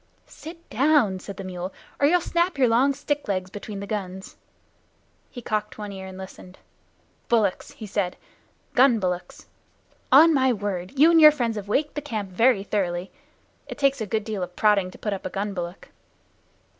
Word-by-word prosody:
"Sit 335 +2 -12
down," 255 -6 +3
said 195 +1 -9
the 195 - -6
mule, 185 0 -5 0.3
"or 285 - +4
you'll 355 +3 +3
snap 345 0 0
your 260 -2 +4
long 245 +5 +3
stick 290 +1 -3
legs 185 -2 -2
between 205 0 -7
the - - -5
guns." 190 -2 -6 0.9
He 245 - -10
cocked 215 -1 -3
one 210 -1 -6
ear 190 -1 -8
and 190 0 -10
listened. 190 -1 -11 0.7
"Bullocks!" 215 -5 +1
he 220 - -9
said. 200 -3 -2 0.6
"Gun 255 -2 +5
bullocks. 180 -3 -4 0.7
On 315 +5 +8
my 260 -3 +3
word, 200 +1 -4
you 310 +5 +6
and 330 -1 +5
your 305 - +11
friends 240 -6 -2
have 205 -2 -6
waked 285 +8 0
the 295 - -4
camp 215 -9 -5
very 225 +1 +3
thoroughly. 185 -3 -2 0.6
It - - -8
takes 275 -2 +1
a 215 - -3
good 220 +1 -1
deal 210 -2 -4
of 180 0 -5
prodding 205 -3 +3
to - - -13
put 210 - -3
up 195 - -6
a - - -4
gun 200 +2 -3
bullock." 175 0 -6
210 Hz, 185 wpm, -24 LUFS, 190-270 Hz, 0.9 s, your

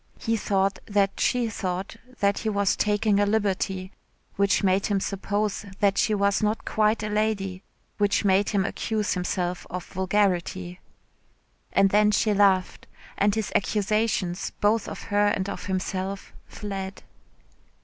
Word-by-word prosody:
He 225 -1 -1
thought 195 -2 0
that 200 -2 +1
she 245 -2 +2
thought 190 -1 -4 0.3
that 200 0 +2
he 220 - -1
was 200 -2 +1
taking 210 0 +2
a 205 - +4
liberty, 195 -3 -1 0.4
which 200 0 +2
made 190 0 +2
him 200 -2 +1
suppose 205 +2 -2 0.2
that 200 -1 +3
she 215 +1 +2
was 200 0 +2
not 215 +1 0
quite 215 0 +1
a - - -1
lady, 210 -3 -1 0.4
which 205 0 +2
made 195 +1 +3
him 195 -2 +1
accuse 215 0 -1
himself 180 0 -2
of 180 0 -5
vulgarity. 185 -2 -1 0.9
And 195 0 +4
then 210 +1 +5
she 210 0 +2
laughed, 195 -2 +2 0.3
and 200 +1 +2
his 220 -2 -2
accusations, 210 -3 0
both 210 +1 +2
of - - -7
her 205 0 +4
and 195 -2 0
of - - -5
himself, 190 +1 -3
fled. 195 -1 -6
200 Hz, 145 wpm, -25 LUFS, 190-210 Hz, 0.9 s, then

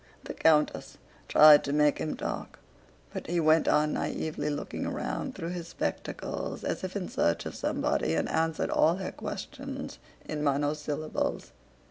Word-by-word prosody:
The - - -6
countess 155 -2 +2 0.3
tried 150 -1 +8
to 140 - -2
make 150 0 +3
him 155 - -3
talk, - - -5 0.6
but - - -5
he 175 +1 0
went 160 0 +4
on 150 0 +3
naïvely 150 -1 -2
looking 145 0 -4
around 265 - -3
through 170 -2 -4
his 175 -1 -5
spectacles 170 - -4
as - - -2
if 185 +1 -4
in 195 -3 -2
search 85 - 0
of - - -5
somebody 80 - 0
and - - 0
answered 160 0 0
all 165 +2 +4
her 190 0 -4
questions - - -6 0.3
in 150 -1 -3
monosyllables. 150 +1 -1
155 Hz, 150 wpm, -29 LUFS, 150-165 Hz, 0.6 s, tried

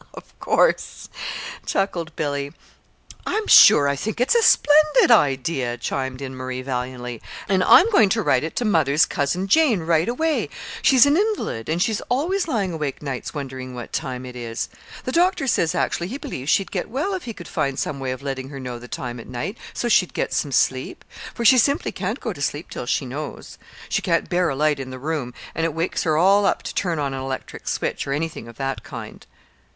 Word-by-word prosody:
"Of - - -14
course," - - +1 0.5
chuckled 170 -5 -2
Billy. 145 -2 -2 0.8
"I'm 435 0 -1
sure 145 - +8
I 140 - +1
think 215 +12 -4
it's 250 - +3
a 470 - +4
splendid 300 - +5
idea," 135 - +2
chimed 130 +2 -3
in 130 -1 -6
Marie, 130 0 -5
valiantly; 125 -2 -4 0.3
"and 190 -1 +2
I'm 370 - +7
going 220 - +5
to 225 +2 +1
write 140 -5 +2
it 160 - -5
to 245 - -1
mother's 155 -7 +3
Cousin 175 +7 -1
Jane 265 - +4
right 165 +3 +1
away. 315 +6 0 0.3
She's 265 -1 +6
an 285 +2 +3
invalid, 400 - -1
and 165 +2 0
she's 215 +3 0
always 340 +10 0
lying 200 - -1
awake 150 -3 -4
nights 135 +1 -5
wondering 130 -3 -6
what 120 -1 -8
time 130 -1 -3
it 125 -1 -9
is. 115 -1 -4 0.3
The 255 - -3
doctor 355 -1 +2
says 180 -9 +1
actually 175 0 -1
he 245 +8 -5
believes 135 - -6
she'd 195 +1 +2
get 185 0 -3
well 290 - -2
if 370 -6 -4
he 230 - -5
could 175 - -10
find 140 -1 -2
some 140 -1 -3
way 135 -1 -3
of 130 +1 -5
letting 135 -1 -4
her 140 -1 -8
know 125 -2 -6
the 120 - -11
time 120 -1 -5
at - - -10
night, 150 - -4 0.2
so 240 - -3
she'd 190 -6 +3
get - - -1
some 145 - -1
sleep; 130 0 0 0.3
for 235 - -3
she 255 +3 +7
simply 280 +5 +1
can't 200 +7 -3
go 225 - -4
to 145 - -11
sleep 145 +3 -3
till 120 - -6
she 135 - 0
knows. 140 +4 -7 0.3
She - - 0
can't - - 0
bear 175 -1 +2
a 135 - -2
light 150 0 +1
in 130 -1 -6
the 130 - -7
room, 140 -3 -4 0.2
and 165 - -2
it 165 -2 -1
wakes 165 +2 -1
her 155 -2 +2
all 195 +4 +4
up - - 0
to - - -5
turn 175 -4 -1
an 140 -2 -2
electric 130 0 -6
switch, - - -2
or 140 - -1
anything 155 -5 -4
of 115 -1 -12
that 135 -1 -3
kind." - - -9
155 Hz, 210 wpm, -22 LUFS, 130-215 Hz, 0.8 s, sure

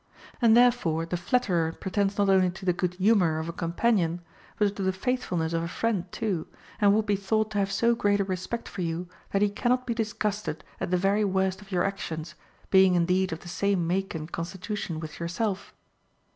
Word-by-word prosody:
And 230 -1 +6
therefore 235 -10 +3
the 165 - -3
flatterer 175 -5 +1
pretends 200 +2 -1
not 200 -1 +3
only 190 -1 +4
to 190 +2 -8
the 180 - +3
good 180 0 -2
humor 185 -5 +3
of 160 +1 -3
a 170 - -4
companion, 175 0 0 0.4
but 205 -1 +1
to 200 - -5
the 190 0 +2
faithfulness 185 -6 -1
of 165 - +1
a 170 - -2
friend 190 -2 -1
too, 200 -8 -2 0.3
and 205 -1 +5
would 215 0 +1
be 205 - +2
thought 215 +2 0
to 205 - 0
have 195 0 0
so 235 +4 +3
great 205 -3 +1
a - - +3
respect 190 +5 -4
for 190 - -6
you 170 +1 -2 0.2
that 200 +1 +1
he 205 - +3
cannot 250 +4 0
be 235 - -1
disgusted 210 -6 -2 0.2
at - - -2
the 180 - +2
very 195 +3 +2
worst 190 -1 0
of 205 0 -15
your 180 -1 +2
actions, 170 -5 -4 0.4
being 190 -1 +6
indeed 180 +2 +2
of 160 - -5
the - - -12
same 190 0 0
make 190 +2 -1
and 160 +1 -6
constitution 180 0 -4
with 155 -1 -8
yourself. 185 +4 -2
190 Hz, 205 wpm, -27 LUFS, 175-210 Hz, 0.4 s, And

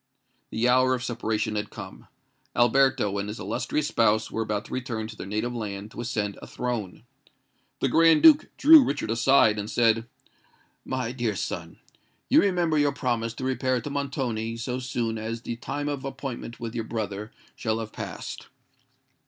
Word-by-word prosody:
The 115 +2 0
hour 130 +1 +4
of 125 - -5
separation 110 -3 -2
had 105 0 -2
come: 95 -2 -10 0.5
Alberto 120 -4 +3
and 100 +1 -3
his 105 - -6
illustrious 140 +9 -2
spouse 110 -1 +2
were 115 - -2
about 105 -2 -2
to - - -9
return 120 -4 -3
to 110 0 -8
their 100 - -7
native 110 +4 -2
land 105 -2 -5
to - - -6
ascend 105 -4 -2
a - - -9
throne. 115 -6 -4 0.8
The - - +3
Grand 165 -1 +5
Duke 310 -2 +8
drew 305 0 +9
Richard 140 - -2
aside, 115 -2 +4
and 105 +1 -4
said, 115 0 +2 0.8
"My 130 -3 -2
dear 120 -5 -2
son, 90 - -5 0.5
you - - +6
remember 175 -5 +2
your 145 0 +2
promise 115 -4 -1
to 130 - -7
repair 130 -1 0
to 145 - -6
Montoni 130 -6 -2
so 125 +2 -3
soon 120 -3 -2
as 115 +2 -5
the 120 - -4
time 145 +4 -4
of 145 -2 -3
appointment 135 -3 -6
with 115 -1 -5
your 115 -2 -3
brother 105 -2 -4 0.2
shall 110 -1 -1
have 110 -1 -6
passed." - - -7
115 Hz, 170 wpm, -26 LUFS, 110-130 Hz, 0.8 s, drew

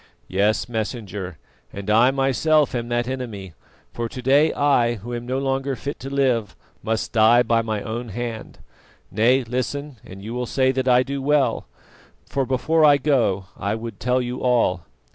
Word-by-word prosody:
"Yes, 100 +4 +1
Messenger, 105 - -5 0.3
and 100 0 -8
I 115 +4 +5
myself 135 +3 +2
am 120 -1 -3
that 120 0 0
enemy; 115 -9 -5 0.4
for 115 -1 -3
to 130 - -8
day 145 +5 +4
I, 125 -5 +2
who 115 +3 -8
am 120 0 -5
no 130 +1 -1
longer 135 0 -1
fit 140 +3 -6
to 135 - -7
live, 125 -7 0 0.3
must 110 0 -2
die 115 +2 +5
by 115 -1 +2
my 110 -2 -3
own 115 +2 -5
hand. 115 +1 -6 0.5
Nay, 120 +6 +3
listen 130 +3 -4
and 95 +1 -11
you 110 +3 -6
will 125 0 -3
say 130 +1 +2
that 130 0 -2
I 125 0 +5
do 140 +1 -4
well, 140 -4 +1 0.6
for 135 -2 -2
before 155 +5 +1
I 145 -2 +7
go 125 -10 +1
I 100 +2 -2
would 115 -2 -7
tell 125 +1 +1
you 125 +1 -5
all. 115 -9 +1
120 Hz, 175 wpm, -22 LUFS, 110-135 Hz, 0.6 s, I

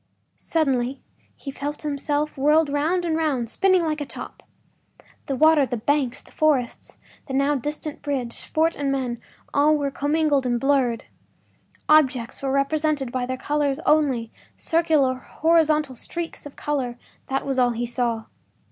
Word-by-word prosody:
” - - -48 0.2
Suddenly 270 -5 +1 0.4
he 275 - -7
felt 290 +3 -5
himself 295 +1 -1
whirled 300 +3 +3
round 320 +5 0
and 325 -2 0
round—spinning 320 - +1
like 310 -2 -1
a - - -2
top. - - -9 0.9
The 275 - -1
water, 310 +1 +5
the 250 -2 -2
banks, 260 +2 0
the - - -20
forests, 280 -6 0 0.3
the 265 - -3
now 275 +2 +2
distant 295 +2 -4
bridge, 260 -5 -4
fort 320 +1 +1
and 280 -1 -1
men, 250 -3 -2 0.3
all 300 +2 +4
were 285 -1 -2
commingled 290 -2 +1
and 240 -1 +1
blurred. 265 -3 +1 0.8
Objects 265 -6 +3
were 270 -1 -1
represented 280 -1 0
by 250 -1 -2
their 260 0 -3
colors 290 -1 0
only; 270 -7 +2 0.3
circular 315 -5 +2
horizontal 305 +1 +1
streaks 330 +4 -6
of 285 - -14
color—that 265 -1 -4
was 270 -1 0
all 245 -1 +4
he 240 0 -2
saw. 235 -2 -1
280 Hz, 150 wpm, -23 LUFS, 255-305 Hz, 0.9 s, water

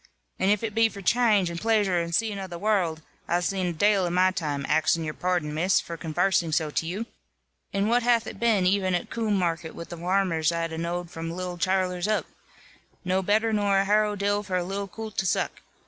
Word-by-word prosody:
"And 190 - +2
if 210 +1 +2
it 220 -2 -2
be 225 +1 +4
for 200 -2 -10
channge, 210 -5 +3
and 170 - -6
plaisure, 210 -5 +2
and 170 0 -4
zeeing 205 +1 0
of 190 - -7
the 175 - -6
warld, 175 -5 0 0.2
I've 175 +1 +1
zeen 185 0 -1
a - - -3
dale 195 +2 +3
in 175 - -2
my 185 +1 +4
time, 150 -7 -3
axing 155 +1 +2
your 155 -1 -3
pardon, 175 -4 -1
Miss, 175 +5 +2
for 170 - -6
convarsing 170 +1 0
so 155 -1 +1
to 160 - -1
you. 200 +7 -3 0.7
And 200 +1 0
what 240 +2 +3
hath 235 -1 +2
it - - -8
been 220 -5 +2
even 185 -1 +2
at 175 - -4
Coom 220 -3 0
market, 165 -3 -2
with 170 - -8
the 175 - -7
varmers 175 -2 +1
I've 165 -1 -2
a 160 - -5
knowed 170 +1 -3
from 165 0 -5
little 180 +1 -5
chillers 185 0 0
up? 215 0 0 0.8
No 185 +1 +1
better 220 +4 +1
nor 205 -2 +2
a 195 - +3
harrow 210 +1 +2
dill 205 +1 0
for 190 -3 -2
a 180 - 0
little 195 +2 -4
coolt 220 +2 -8
to 195 - 0
zuck. - - -1
185 Hz, 225 wpm, -26 LUFS, 170-205 Hz, 0.8 s, be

